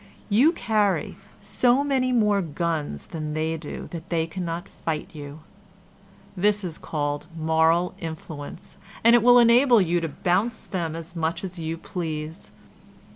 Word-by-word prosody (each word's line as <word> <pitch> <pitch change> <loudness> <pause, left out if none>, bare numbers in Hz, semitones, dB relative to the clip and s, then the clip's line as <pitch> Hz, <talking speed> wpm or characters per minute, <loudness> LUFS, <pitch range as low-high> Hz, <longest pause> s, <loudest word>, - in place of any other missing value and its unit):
You 245 +10 +5
carry 210 - 0 0.3
so 250 +3 +2
many 265 -3 +1
more 210 -4 +3
guns 160 - -3
than 155 -2 -5
they 160 +1 -1
do 155 -2 -7
that 170 +1 -8
they 165 -2 +1
cannot 170 0 -5
fight 155 -2 -4
you. 145 0 -9 0.9
This 205 +2 +2
is 170 -3 -5
called 145 -1 -3
moral 160 +2 +2
influence, 160 -3 -8 0.3
and 230 +1 +7
it 240 - +5
will 245 +2 +7
enable 240 +1 +6
you 175 -2 +1
to 165 - -1
bounce 185 +9 -1
them 165 -4 -3
as 165 +2 -7
much 165 +1 -2
as 185 -2 -6
you 165 0 -3
please. 160 -1 -5
170 Hz, 145 wpm, -25 LUFS, 160-210 Hz, 0.9 s, and